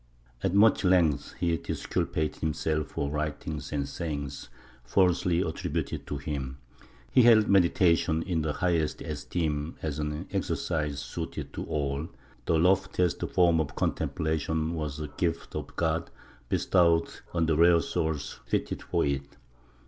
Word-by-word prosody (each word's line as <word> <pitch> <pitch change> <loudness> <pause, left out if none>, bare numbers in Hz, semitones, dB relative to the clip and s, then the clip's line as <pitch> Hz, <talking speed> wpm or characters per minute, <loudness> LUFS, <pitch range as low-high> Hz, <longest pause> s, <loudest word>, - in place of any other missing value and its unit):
At 95 0 0
much 105 +1 +5
length 90 -6 +2
he 85 -2 +2
disculpated 75 -1 -2
himself 75 0 -1
for 70 0 -3
writings 75 -1 -3
and 70 -2 -1
sayings 70 -5 -5 0.3
falsely 90 +4 +2
attributed 80 -4 -3
to 70 - -3
him. 70 -2 -4 0.5
He - - +6
held 115 -3 +6
medi 95 -3 +5
tation 85 -3 +2
in 85 -4 -1
the 75 -1 -1
highest 85 -3 0
esteem 75 0 -2
as 75 -2 -2
an 75 0 -3
exercise 75 -4 -1
suited - - -5
to - - -4
all; 70 +1 -2 0.4
the 80 - +3
loftiest 90 0 +2
form 85 -3 +4
of 75 -3 -2
contemplation 80 +1 -1
was 75 -3 -4
a 75 - -3
gift 85 -2 -1
of - - -5
God 80 0 0 0.4
bestowed 85 -3 +3 0.2
on 85 -1 +1
the 80 -1 +2
rare 85 +1 +6
souls 80 -2 -2
fitted - - -1
for - - 0
it. 70 -1 -3
80 Hz, 140 wpm, -28 LUFS, 75-85 Hz, 0.5 s, He